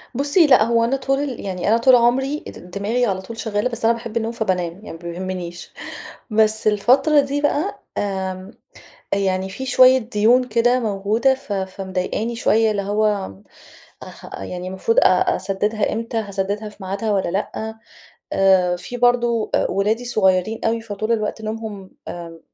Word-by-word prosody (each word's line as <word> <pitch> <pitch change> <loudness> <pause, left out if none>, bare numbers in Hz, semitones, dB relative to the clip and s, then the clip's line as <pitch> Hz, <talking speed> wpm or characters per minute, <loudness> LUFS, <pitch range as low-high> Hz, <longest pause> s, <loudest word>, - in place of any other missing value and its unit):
بُصّي، 290 +5 +4
لأ 265 - +6
هو 230 +1 +2
أنا 240 +4 +1
طول 270 -1 -2
يعني 185 -2 -4
أنا 225 - +5
طول 250 +2 +6
عمري 265 +5 +2
د 180 - -11
دماغي 215 +6 0
على 190 -4 -1
طول 225 +4 -9
شغالة، 215 +2 -1
بس 235 -2 -4
أنا 230 - +5
باحب 230 0 -5
النوم 225 0 -1
فبانام 185 -7 -1
يعني 205 +4 -11
ما - - -8
بيهمنيش، 175 0 -6 0.6
بس 220 0 +2
الفترة 260 +9 +4
دي 280 +1 0
بقى 300 +6 -1
آمم، 190 0 -3 0.6
يعني 190 -1 0
في 265 +7 -6
شوية 255 0 +6
ديون 235 +1 +2
كده 245 +3 +3
موجودة 215 +4 +1
ف 260 -6 -7
فمضايقاني 190 +3 -3
شوية، 225 -1 +2
اللي 205 -1 -1
هو 205 - 0 0.7
اح - - -12 0.2
يعني 180 - -6
المفروض 190 +5 -1
أ 185 - +3
أسددها 205 +2 -1
إمتى، 230 +1 -3
هاسددها 205 0 -3
في 210 - -18
ميعادها 200 +3 -2
والّا 190 -4 0
لأ؟ 215 +3 -3 0.6
آآ، 185 -2 +3
في 180 +7 -7
برضو 240 -2 +2
أ - - +2
ولادي 210 +5 0
صغيّرين 195 -1 +1
أوي، 230 +1 +1
فطول 215 +1 -3
الوقت 215 0 -2
نومهم 215 -3 -6 0.2
آآ، 165 -1 -8
215 Hz, 160 wpm, -21 LUFS, 190-235 Hz, 0.7 s, لأ